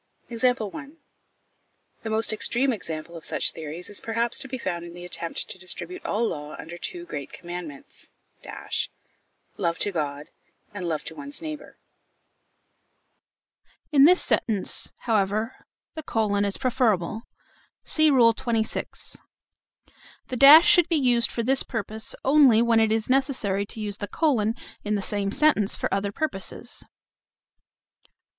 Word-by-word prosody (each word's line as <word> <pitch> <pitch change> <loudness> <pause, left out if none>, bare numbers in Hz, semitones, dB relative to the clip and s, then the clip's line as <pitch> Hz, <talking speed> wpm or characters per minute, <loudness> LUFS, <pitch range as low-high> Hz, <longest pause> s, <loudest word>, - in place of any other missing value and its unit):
The 250 +5 -1 1.1
most 220 0 0
extreme 245 +5 +1
example 165 -4 -6
of 165 - -9
such - - -1
theories 160 +2 -6
is 205 - -4
perhaps 230 +1 -1
to 270 - -4
be 260 0 -4
found 175 -7 -3
in 170 0 -10
the 175 0 -9
attempt 170 -1 -3
to 185 - -8
distribute 270 - -6
all 225 +3 0
law 150 -4 -6
under 165 - -9
the - - -21
two 350 -1 -5
great 140 - -6
commandments 175 -5 -8 1.5
love 170 -1 -1
to 205 - 0
God, 145 -3 -4 0.4
and 185 -4 -4
love 155 -3 -2
to - - -7
one's 285 -1 -7
neighbour. 310 -2 -8 2.1
In 280 -2 +7
this 360 +3 +6
sentence, 210 -4 0
however, 215 +1 0 0.4
the 315 - -6
colon 210 -7 0
is 200 - -1
preferable. 230 -5 0 0.6
(See 310 -1 +3
Rule 240 -5 +5
XXVI.). 225 -1 -3 1.1
The 255 - -3
dash 285 +6 +9
should 350 -2 +6
be 335 - +3
used 245 -5 +3
for 235 - -2
this 265 +3 +2
purpose 220 -2 -3
only 270 -5 +6
when 230 -1 +3
it 220 -1 +3
is 220 0 0
necessary 255 -7 +1
to 225 - -10
use 205 -2 -4
the 205 - -4
colon 230 - +1 0.3
in 210 0 0
the 200 - -1
same 200 -1 +1
sentence 260 -5 +2
for - - -2
other 200 +1 -1
purposes. 200 -6 -3
220 Hz, 140 wpm, -25 LUFS, 195-265 Hz, 2.1 s, dash